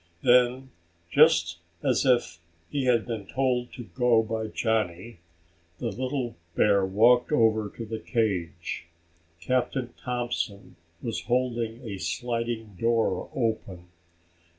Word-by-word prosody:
Then, 125 +2 +4 0.4
just 85 0 +4 0.2
as - - +2
if 120 -10 +2 0.3
he 140 -2 -1
had 120 -3 +3
been 110 -5 -5
told 125 -1 0
to 125 - -7
go 120 -1 +2
by 110 0 -3
Johnny, 110 -3 -2 0.6
the 115 -2 -3
little 130 +2 -3 0.2
bear 100 -2 +4
walked 115 +7 +4
over 110 -6 +3
to 115 - -5
the 110 0 -5
cage. 100 -10 -2 0.5
Captain 125 +5 -1
Thompson 120 -5 -3 0.3
was 115 - -3
holding 120 -1 -1
a 100 -3 -5
sliding 115 -2 -3
door 115 -5 +1
open. 110 -7 -2
115 Hz, 115 wpm, -27 LUFS, 105-125 Hz, 0.6 s, Then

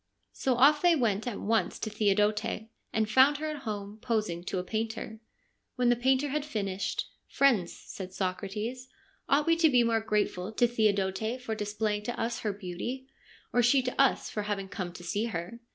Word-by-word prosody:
So 260 -2 0
off 285 +5 +5
they 350 -1 +5
went 225 -5 0
at 235 - -3
once 225 +2 0
to 215 - -4
Theodote, 210 +1 +1 0.3
and 220 -1 +1
found 260 +6 +5
her 310 +1 -3
at 305 - -5
home, 205 0 -5
posing 215 -8 -1
to 190 - -2
a 180 - -1
painter. 220 +2 -4 0.6
When 250 -1 +2
the 245 - +5
painter 265 +4 +2
had 300 +1 -1
finished, 200 -9 -2
' - - -46
Friends,' 235 -11 +4
said 190 -1 -8
Socrates, 205 +7 -3 0.2
' - - -36
ought 290 +2 +3
we 330 - +4
to 330 -1 +5
be 250 -3 +5
more 230 -1 +2
grateful 210 -3 -1
to 240 - +3
Theodote 220 0 0
for 245 -3 -4
displaying 210 0 -2
to 240 - -4
us 230 +1 -1
her 215 - -1
beauty, 205 +8 -6 0.4
or 245 - +4
she 250 +3 +4
to 255 +2 +1
us 275 - +2
for 210 - -3
having 205 -2 -3
come 185 -3 -4
to 175 0 -11
see 200 +6 -1
her 200 +1 -5
220 Hz, 195 wpm, -29 LUFS, 200-250 Hz, 0.6 s, off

